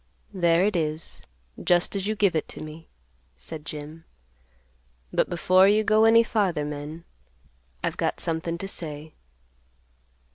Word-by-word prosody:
"There 170 -2 +3
it 210 -1 0
is 155 -1 -3 0.4
just 175 +2 +2
as 195 0 -2
you 215 - 0
give 200 -5 +2
it 155 - -1
to - - -8
me," 155 +1 -10 0.5
said 150 - -8
Jim. 155 +2 -8 1.1
"But - - +2
before 185 +2 +4
you 210 +2 +4
go 215 +1 +4
any 230 +1 +7
farther, 195 -10 0
men, 150 +3 -6 0.8
I've - - -2
got - - -1
something 165 +1 -2
to 195 - -5
say." 155 -4 -7
170 Hz, 140 wpm, -25 LUFS, 155-195 Hz, 1.1 s, any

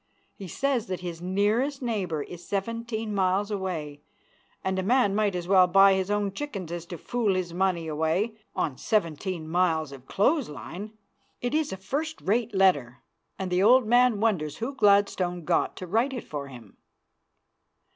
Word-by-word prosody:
He 195 - -9
says 265 - -1
that 185 -1 -4
his 170 -2 -6
nearest 210 +10 +1
neighbor 195 - -2
is 175 +2 -10
seventeen 225 +2 -3
miles 195 +2 +1
away, 165 -7 -4 0.6
and 190 0 -1
a - - +1
man 205 0 +3
might 205 -2 +1
as 175 -1 -4
well 185 -1 +6
buy 195 +2 +6
his 190 0 -1
own 205 -1 0
chickens 195 - -5
as 170 -1 -5
to 175 - -7
fool 220 0 0
his 180 -2 -2
money 180 -2 0
away 160 +8 0 0.2
on 140 -5 -2
seventeen 170 -4 -1
miles 160 -3 +1
of 135 -2 -12
clothes 270 +6 +1
line. 190 +9 -8 0.4
It 245 +2 -3
is 310 -1 +1
a 190 - -4
first 295 - -3
rate 225 +2 0
letter, 145 -11 +2 0.3
and 190 -1 -4
the 180 +1 +2
old 245 +4 +6
man 245 -1 +4
wonders 185 -10 0
who 235 +5 -3
Gladstone 200 - +2
got - - +1
to 185 - -7
write 230 +9 +1
it 250 - -5
for 145 -2 -6
him. 120 -6 -13
190 Hz, 170 wpm, -27 LUFS, 175-220 Hz, 0.6 s, well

